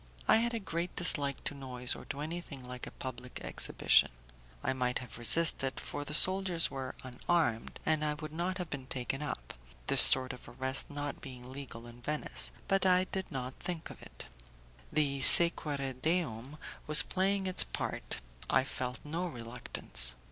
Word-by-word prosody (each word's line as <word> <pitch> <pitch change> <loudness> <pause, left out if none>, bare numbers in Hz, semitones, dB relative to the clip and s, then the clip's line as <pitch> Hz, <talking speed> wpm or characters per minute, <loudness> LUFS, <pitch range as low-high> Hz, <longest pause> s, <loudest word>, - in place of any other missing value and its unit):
I - - +5
had 235 +1 -1
a - - -3
great 175 -3 -6
dislike 145 -6 +3
to - - -4
noise 125 -3 -4
or - - -12
to 140 - -7
anything 150 -5 -8
like 125 0 -8
a - - -14
public 125 -1 -8
exhibition. - - +2 0.5
I - - -1
might 125 -1 -2
have 125 -1 -10
resisted, 135 +1 +1
for 145 - -6
the 150 +1 -2
soldiers 185 -2 +3
were 135 -1 -7
unarmed, 130 -1 -3
and 155 -1 0
I 150 -1 -2
would 155 0 -10
not 180 +3 -3
have 180 -4 -7
been 135 -3 -7
taken 135 +1 -5
up, 65 - -7 0.3
this - - +8
sort 130 0 +8
of 125 - -13
arrest 130 +1 +1
not 145 0 -6
being 125 -1 -11
legal 130 -4 -10
in 120 0 -14
Venice, 65 - -2 0.2
but 195 0 +1
I 185 -1 +3
did 190 -1 -5
not 130 -1 -6
think 175 -3 -6
of - - -14
it. - - -12 0.7
The 140 -3 -1
'sequere 145 -4 +7
deum' 150 -5 -3 0.3
was 150 +2 +6
playing 195 +1 -2
its 185 -1 +4
part; - - -6 0.3
I - - +2
felt 125 -2 -6
no 165 +5 -5
reluctance. 115 - -1
140 Hz, 170 wpm, -30 LUFS, 125-170 Hz, 0.7 s, this